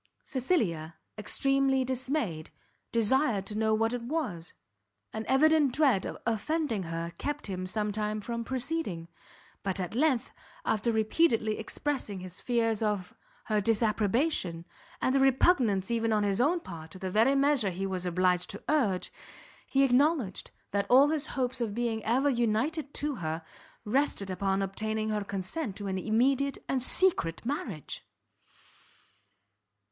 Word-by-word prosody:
Cecilia, 195 - -1 0.2
extremely 270 +4 +1
dismayed, 255 - -2 0.4
desired 230 -2 +2
to 210 - -5
know 220 0 +2
what 225 +2 +1
it 245 - -2
was; 235 - -4 0.6
an 220 0 -4
evident 295 0 +4
dread 265 -10 +3
of - - -6
offending 235 +1 0
her 165 0 -4
kept 295 0 -3
him 185 -2 -4
some 210 +2 -1
time 210 +1 -2
from 235 +2 -4
proceeding, 255 - -3 0.5
but 195 -1 -2
at 180 +1 -3
length, 260 -1 +1 0.3
after 220 +2 +1
repeatedly 220 0 +2
expressing 220 -3 -3
his 185 0 -8
fears 230 -3 +1
of 205 -4 -1 0.3
her 215 -1 +1
disapprobation, 215 - +1 0.4
and 260 - +2
a - - +4
repugnance 255 - +3
even 230 -1 +1
on 210 -1 +2
his 200 +2 +1
own 330 +7 +3
part 160 - -9
to 175 - -10
the 185 0 -4
very 230 +7 +4
measure 275 -6 +3
he 190 +2 -3
was 185 -2 -3
obliged 180 0 +1
to 205 - -7
urge, 230 -12 +1 0.5
he 275 0 +3
acknowledged 270 - +2 0.2
that 200 0 -1
all 270 +4 +7
his 310 -1 0
hopes 255 -1 0
of 215 -3 -2
being 230 -2 -1
ever 255 +5 +2
united 265 +5 0
to 290 -3 -2
her, 160 -2 -3 0.4
rested 215 -4 +1
upon 195 +1 0
obtaining 215 +3 -2
her 210 -1 -1
consent 200 - -4
to 205 - -6
an 190 -1 -2
immediate 260 +7 +1
and 265 -1 0
secret 250 - +3
marriage. 240 - -4
220 Hz, 145 wpm, -29 LUFS, 195-270 Hz, 0.6 s, all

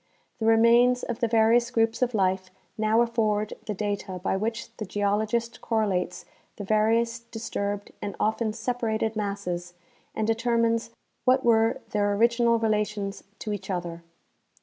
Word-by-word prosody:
The 220 - 0
re 225 0 +6
mains 240 +2 +5
of 240 -1 -4
the 235 - +2
various 230 +1 +4
groups 225 -1 +1
of 250 -2 +1
life 185 -1 +1 0.3
now 220 +1 +2
afford 215 -3 0
the 210 - -2
data 200 -2 -3
by 180 +1 -1
which 225 +3 -3
the 215 - -4
geologist 215 +4 -1
correlates 200 -6 -1 0.3
the 205 - -6
various 225 +3 +2
disturbed 220 -3 -4
and 200 - -4
often 220 +1 0
separated 225 -1 -1
masses 180 -4 -3 0.4
and 220 - 0
determines 230 0 +1 0.4
Avhat 260 +1 +4
were 225 -1 +3
their 205 -1 +1
original 235 +1 +3
relations 210 -2 -1
to 215 - -4
each 195 -1 -6
other. 175 -2 -3
220 Hz, 145 wpm, -26 LUFS, 205-230 Hz, 0.4 s, re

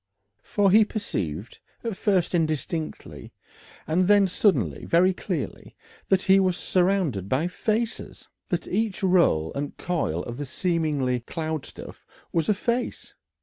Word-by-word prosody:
For 200 -2 +2
he 215 +3 +7
perceived, 100 - -4 0.2
at 230 -4 -3
first 185 -3 +1
indistinctly, 160 -1 -3 0.5
and 175 +3 +1
then 205 -1 +6
suddenly 130 - +1
very 185 +3 +3
clearly, - - -5 0.3
that 190 -1 +3
he 195 0 +5
was 185 -2 +1
surrounded 175 - +1
by 140 +6 +1
faces! 225 +4 -2 0.2
that 175 - -1
each 210 0 -1
roll 170 - +3
and 140 +1 -4
coil 145 - -1
of 120 0 -7
the 145 - -4
seeming 150 -7 0
cloud 160 -3 -3
stuff - - -11 0.3
was 165 +2 +1
a 210 - +4
face. 235 +4 -2
175 Hz, 135 wpm, -25 LUFS, 145-195 Hz, 0.5 s, he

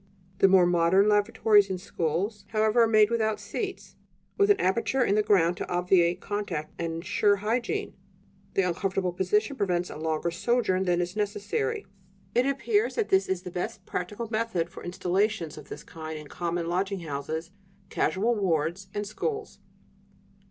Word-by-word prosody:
The - - +7
more 190 -2 +6
modern 175 +3 +4
lavatories 210 -1 +4
in 190 - -2
schools, 185 +4 -2
however, 220 +2 +2
are 230 - +5
made 215 -1 +4
without 220 -2 0
seats; 380 - -5 0.4
with 400 0 +3
an 410 - +5
aperture 235 +7 +1
in 200 - +2
the 215 - +4
ground 180 -5 +3
to - - -5
obviate 175 -1 +2
contact 190 -8 -4
and 165 -1 -2
ensure 190 +5 +2
hygiene: 225 +4 -2 0.6
the 195 - +3
uncomfortable 180 +1 -1
position 210 +9 +1
prevents 180 -4 0
a - - -7
longer 160 +2 -1
sojourn 190 0 +1
than 175 -1 +2
is 175 +2 -4
necessary. 205 -8 -2 0.5
It 245 +2 +3
appears 415 - +1
that 450 -3 -1
this 385 0 +3
is 185 -1 -1
the 180 - -7
best 185 +3 -4
practical 210 +6 -4
method 215 -7 -1
for - - -10
installations 180 -1 -1
of 150 -2 -12
this - - -8
kind 160 -1 -7
in 150 -1 -10
common 170 0 -2
lodging 190 +2 -1
houses, 160 +2 -4 0.4
casual 220 +6 +1
wards, 175 -2 -1
and 205 0 -2
schools." 420 - -4
190 Hz, 160 wpm, -27 LUFS, 175-215 Hz, 0.6 s, The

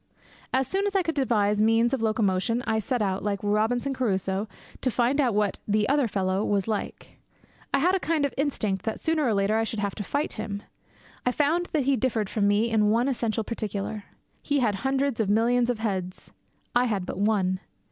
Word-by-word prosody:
As 265 0 +1
soon 395 +1 0
as 400 - -3
I 385 - +3
could 325 - -1
devise 210 -7 +1
means 225 +3 +3
of 265 - 0
locomotion, 220 +1 +1
I 220 0 +1
set 235 +1 -1
out, 190 -1 -1
like 200 -1 -1
Robinson 220 +6 +1
Crusoe, 195 -4 -1 0.3
to 255 - +1
find 250 +4 +2
out 245 -6 +1
what 210 -2 +1
The 210 0 +2
Other 280 -2 +2
Fellow 195 -1 0
was 200 -2 0
like. 215 -2 -4 0.5
I - - +3
had 350 +7 +3
a 385 - +2
kind 320 -4 +1
of 280 - -3
instinct 215 -9 -1
that 220 - -3
sooner 320 -1 0
or 230 -6 +2
later 200 +2 +2
I 225 - +2
should 225 0 -3
have 200 -1 -1
to 205 - -5
fight 285 +9 -2
him. 210 -2 -5 0.6
I 250 - +2
found 320 +6 +1
that 300 -3 0
he 270 0 +2
differed 225 -4 -1
from 205 -2 +1
me 210 +3 +2
in 210 -2 +3
one 235 +4 +2
essential 230 -4 -1
particular. 210 -1 -4 0.4
He 285 - 0
had 230 -5 +2
hundreds 265 +1 0
of 215 -3 +1
millions 235 +3 +3
of 245 - 0
heads; 190 -5 -4 0.4
I 245 +1 +4
had 205 -6 -1
but - - -5
one. 195 -3 +1
225 Hz, 210 wpm, -26 LUFS, 205-260 Hz, 0.6 s, I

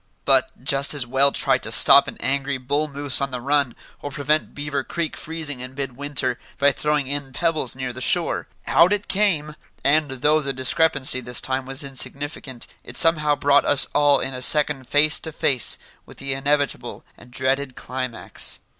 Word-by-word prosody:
But, - - +1
just 140 +2 +3
as 140 -4 -2
well 135 +3 +3
try - - +2
to - - -3
stop - - +6
an - - -8
angry 135 +1 -1
bull 145 +4 -2
moose 140 -2 0
on 140 - -1
the 125 -2 -5
run, 140 0 0 0.3
or 145 - -5
prevent 150 +2 -1
Beaver 145 -1 -3
Creek 170 +1 -4
freezing 155 -4 -5
in 125 +1 -9
mid 135 -3 -5
winter 135 -3 -2 0.2
by 140 +1 +4
throwing 150 0 -1
in 140 0 -4
pebbles 160 -7 -1
near 130 -1 -5
the 130 - -8
shore. - - +1 0.2
Out 170 +4 +4
it 205 -1 -3
came! 175 -7 0 0.3
And, 150 +1 +2
though 150 +4 +1
the 135 -1 -3
discrepancy 130 0 +2
this 125 0 +1
time 130 0 -2
was 135 +2 -3
insignificant, 135 -1 -5 0.2
it - - -11
somehow 150 -3 +3
brought 145 0 +3
us 145 - +5
all 145 -1 +3
in 135 - -4
a 125 - -5
second 145 -1 +3
face 150 +1 +3
to 160 - -7
face 130 -5 +1 0.3
with - - -14
the 135 0 -3
inevitable 145 +1 -2
and 125 - -18
dreaded 130 +1 -2
climax. 130 -2 -4
140 Hz, 180 wpm, -21 LUFS, 130-150 Hz, 0.3 s, stop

